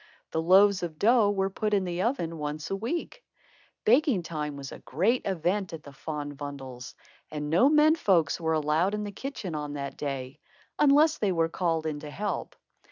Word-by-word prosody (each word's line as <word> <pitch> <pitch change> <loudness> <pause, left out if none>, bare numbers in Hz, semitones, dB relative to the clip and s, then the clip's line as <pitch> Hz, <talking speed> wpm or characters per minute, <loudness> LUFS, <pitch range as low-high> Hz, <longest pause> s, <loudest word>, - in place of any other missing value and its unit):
The 160 - 0
loaves 190 +3 +5
of 165 -3 -5
dough 225 +1 +4
were 195 -1 0
put 210 +1 0
in 195 - +1
the 175 0 -2
oven 170 - -1
once 150 +2 -4
a - - +1
week. 325 - -4 0.6
Baking 245 - +4
time 150 -3 -4
was 135 -1 -7
a - - -9
great 195 - +1
event 185 +1 -1
at 160 -2 -7
the 140 - -11
Van 145 +1 -6
Bommels' 135 -3 -8 0.3
and 150 -1 -4
no 215 - +5
men 305 +1 +5
folks 175 - +2
were 160 0 +1
allowed 160 +6 +1
in 210 - -3
the 205 - -5
kitchen 200 - -6
on 150 -1 -4
that 140 -1 -5
day, 135 0 -5 0.4
unless 300 +2 +5
they 205 -3 +1
were 165 -2 +1
called 165 -2 -1
in 155 -2 -2
to 150 - -8
help. 205 +7 -4
170 Hz, 190 wpm, -28 LUFS, 150-205 Hz, 0.6 s, loaves